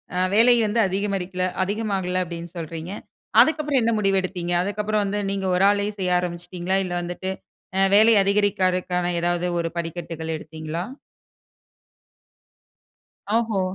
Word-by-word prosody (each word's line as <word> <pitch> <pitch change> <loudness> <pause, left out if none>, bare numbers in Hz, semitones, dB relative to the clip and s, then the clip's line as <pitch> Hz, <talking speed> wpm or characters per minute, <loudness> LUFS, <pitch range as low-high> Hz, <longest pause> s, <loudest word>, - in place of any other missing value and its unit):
அ - - -1 0.2
வேலை 240 +3 +6
வந்து 215 +2 0
அதிகமாகல- 190 -1 -2 0.2
அதிகமாகல 195 -3 -1
அப்டின்னு 170 0 -8
சொல்றீங்க, 165 +1 -6 0.5
அதுக்கப்புறம் 300 -4 +2
என்ன 230 0 +2
முடிவு 195 -1 +2
எடுத்தீங்க? 180 -2 -3
அதுக்கப்புறம் 210 +2 -1
வந்து 200 +1 -1
நீங்க 195 -1 -2
ஒரு 180 - +2
ஆளே 205 0 +1
செய்ய 180 -1 +2
ஆரம்பிச்சிட்டீங்களா? 175 +1 -3
இல்ல 180 - -4
வந்துட்டு 175 +2 -4 0.5
அ - - +4
வேலை 220 +2 +7
அதிகரிக்கிறதுக்கான 185 -3 +1
ஏதாவது 175 +1 0
ஒரு 170 - -1
படிக்கட்டுகள் 165 -1 -4
எடுத்தீங்களா? 155 +1 -6 2.6
ஓஹோ! 220 -4 0
185 Hz, 120 wpm, -23 LUFS, 175-205 Hz, 2.6 s, வேலை